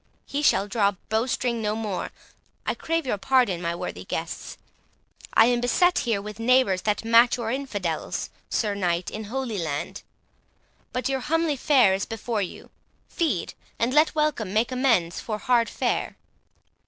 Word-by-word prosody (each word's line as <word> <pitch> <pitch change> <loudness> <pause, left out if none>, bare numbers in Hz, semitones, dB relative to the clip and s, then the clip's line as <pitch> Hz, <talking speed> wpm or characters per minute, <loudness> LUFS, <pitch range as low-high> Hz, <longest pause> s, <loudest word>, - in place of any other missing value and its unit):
—he 285 - -3
shall 205 -8 +3
draw 205 -2 +2 0.2
bowstring 235 +1 0
no 210 0 0
more.—I 215 -4 -6
crave 330 -1 -2
your 210 -6 -1
pardon, 245 -8 +2
my 170 -1 -1
worthy - - -5
guests. - - -5 0.8
I 225 - +8
am 240 0 +2
beset 355 +9 +3
here 230 -5 0
with 210 +1 -8
neighbours 230 -5 +3
that 210 +2 -1
match 230 +2 +5
your 230 -2 -2
infidels, 205 - -3 0.2
Sir 210 -3 0
Knight, 175 -3 -1
in 215 0 -5
Holy 235 -2 -3
Land. 150 -4 -3 0.9
But 255 +2 -2
your 270 0 0
homely 325 +3 0
fare 255 -7 +4
is 195 +1 -2
before 225 -1 -2
you; 185 - -7 0.4
feed, 335 -2 -1 0.2
and 240 +2 0
let 305 +2 +4
welcome 300 -10 0
make 225 +3 +1
amends 235 -10 +2
for 215 -2 -4
hard 235 +1 +2
fare." - - -1
230 Hz, 155 wpm, -25 LUFS, 205-260 Hz, 0.9 s, I